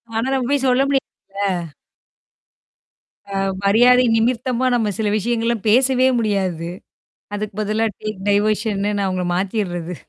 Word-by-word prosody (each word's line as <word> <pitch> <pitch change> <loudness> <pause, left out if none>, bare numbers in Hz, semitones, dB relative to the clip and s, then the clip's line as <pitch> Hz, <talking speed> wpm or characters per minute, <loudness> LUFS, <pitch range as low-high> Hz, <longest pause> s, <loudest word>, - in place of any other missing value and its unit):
ஆனா 225 +3 0
நம்ம 260 -2 0
போய் 280 -1 +1
சொல்ல 250 +1 +3
முடியாதுல? 195 - -3 1.6
அ, 195 - -5 0.3
மரியாதை 245 +5 +5
நிமிர்த்தமா 245 +2 0
நம்ம 220 -3 0
சில 220 -2 -1
விஷயங்கள்லாம் 230 0 -1
பேசவே 255 +2 +4
முடியாது. 190 -6 -1 0.7
அதுக்கு 205 -1 -5
பதிலா 215 +2 0
டேக் 215 -2 -5
டைவர்ஷன்னு 205 0 +1
நான் 200 - 0
அவங்கள 185 -1 -2
மாத்திர்றது. 180 -3 -2
215 Hz, 120 wpm, -20 LUFS, 195-240 Hz, 1.6 s, மரியாதை